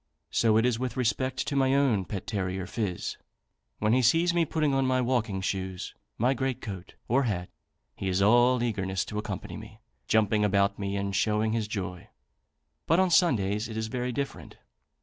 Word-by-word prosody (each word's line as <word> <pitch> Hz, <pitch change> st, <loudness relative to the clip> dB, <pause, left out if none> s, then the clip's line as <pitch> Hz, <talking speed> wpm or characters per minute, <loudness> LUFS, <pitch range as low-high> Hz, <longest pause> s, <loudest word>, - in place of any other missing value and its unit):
So 110 Hz, -2 st, +3 dB
it 115 Hz, -, +3 dB
is 120 Hz, -2 st, +1 dB
with 125 Hz, -2 st, -3 dB
respect 130 Hz, +1 st, 0 dB
to 140 Hz, -, -3 dB
my 135 Hz, 0 st, +3 dB
own 125 Hz, -9 st, +2 dB
pet 95 Hz, -1 st, -5 dB
terrier, 95 Hz, -3 st, -2 dB
Phiz. 100 Hz, -3 st, -3 dB, 0.6 s
When 105 Hz, +1 st, +1 dB
he 130 Hz, -, +4 dB
sees 165 Hz, +8 st, +3 dB
me 170 Hz, -1 st, +2 dB
putting 155 Hz, -2 st, 0 dB
on 135 Hz, 0 st, +2 dB
my 130 Hz, 0 st, +2 dB
walking 120 Hz, -6 st, 0 dB
shoes, 95 Hz, -1 st, -3 dB, 0.2 s
my 125 Hz, +4 st, +2 dB
great 130 Hz, -1 st, -2 dB
coat, 95 Hz, -3 st, -8 dB
or 135 Hz, +3 st, +2 dB
hat, 90 Hz, -6 st, -2 dB, 0.5 s
he 95 Hz, -, -3 dB
is 95 Hz, +1 st, +1 dB
all 120 Hz, +4 st, +4 dB
eagerness 95 Hz, -5 st, -1 dB
to 105 Hz, -, -4 dB
accompany 105 Hz, -3 st, -5 dB
me, 110 Hz, 0 st, -11 dB, 0.3 s
jumping 110 Hz, -1 st, +3 dB
about 100 Hz, 0 st, +2 dB
me 100 Hz, 0 st, -2 dB
and 100 Hz, 0 st, -2 dB
showing 110 Hz, +1 st, +1 dB
his 110 Hz, -2 st, -1 dB
joy. 90 Hz, -4 st, -5 dB, 0.8 s
But 165 Hz, +3 st, +4 dB
on 190 Hz, -1 st, +3 dB
Sundays 110 Hz, -, +2 dB
it 110 Hz, -, -6 dB
is 110 Hz, 0 st, -2 dB
very 125 Hz, +1 st, -2 dB
different. 140 Hz, +3 st, -5 dB
110 Hz, 185 wpm, -28 LUFS, 100-130 Hz, 0.8 s, he